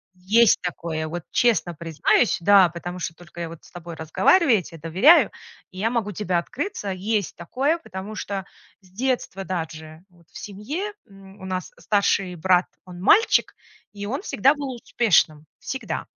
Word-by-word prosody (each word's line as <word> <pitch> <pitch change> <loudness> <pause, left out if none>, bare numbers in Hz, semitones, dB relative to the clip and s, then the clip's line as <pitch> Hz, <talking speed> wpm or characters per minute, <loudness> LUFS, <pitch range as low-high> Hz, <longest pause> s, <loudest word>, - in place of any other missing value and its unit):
Есть 210 +5 +4
такое! 165 -3 -4
Вот 170 +1 -5
честно 225 -7 +2
признаюсь, 165 +8 +1
да, 190 0 +6
потому 175 +2 -7
что 165 -1 -4
только 175 0 -11
я 165 0 -6
с - - -20
тобой 170 -1 -9
разговариваю, 230 - +3
я 185 - -2
те 165 - -12
доверяю, 180 - +5 0.4
и 185 - -10
я 225 - +1
могу 230 -4 -1
тебя 185 -2 -1
открыться. 265 - -4
Есть 200 +1 -2
такое, 265 - -1
потому 190 - -8
что 195 -2 -4 0.4
с 185 - -22
детства 235 -3 -2
даже 160 -3 -6
вот 170 -2 -25
в - - -12
семье, 290 - -5
м, 195 0 -16
у - - -8
нас 185 -1 -4
старший 195 0 +1
брат, 180 +2 +3 0.2
он 180 -1 -11
мальчик, 405 - +4 0.4
и 205 0 -7
он 260 - -3
всегда 275 - +3
был 280 -3 -5
успешным. 175 -10 +1
Всегда. 265 - -5
190 Hz, 165 wpm, -23 LUFS, 170-225 Hz, 0.4 s, да